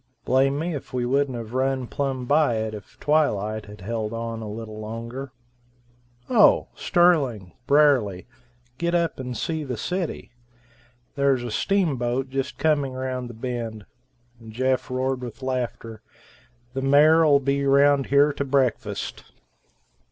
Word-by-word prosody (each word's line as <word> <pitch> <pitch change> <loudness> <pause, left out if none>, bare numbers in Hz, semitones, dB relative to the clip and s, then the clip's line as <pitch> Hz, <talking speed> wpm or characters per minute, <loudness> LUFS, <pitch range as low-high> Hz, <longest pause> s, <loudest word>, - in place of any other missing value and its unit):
Blame 135 +2 +2
me 165 +3 -2
if 140 - -7
we 125 -1 -1
wouldn't 135 0 0
have 115 0 -7
run 130 0 0
plumb 135 0 -3
by 145 -2 +3
it 110 0 -2
if 105 -3 -11
twilight 110 -9 0
had 105 -1 -12
held 110 +2 -3
on 115 0 -4
a 110 - -6
little 110 0 -7
longer. 115 +5 -6 1.0
Oh! 225 -5 +5
Sterling, 140 - +2
Brierly, 135 -11 +3 0.5
get 170 0 0
up 170 -4 0
and 125 -2 -5
see 160 -2 -2
the 130 -4 -4
city. 180 - -4 0.8
There's 140 -3 +1
a 120 - -5
steamboat 135 - 0
just 135 +1 -3
coming 145 -3 +1
round 130 -1 -4
the 120 - -10
bend." 115 -3 -5 0.5
And 115 -1 -12
Jeff 130 +3 0
roared 130 0 -1
with 120 -1 -8
laughter. 120 -4 -4 0.7
"The 135 - -3
mayor'll 150 +2 +5
be 140 +1 0
round 140 0 +4
here 140 +1 +4
to 140 - -2
breakfast." 135 -4 -1
130 Hz, 140 wpm, -24 LUFS, 115-140 Hz, 1.0 s, Oh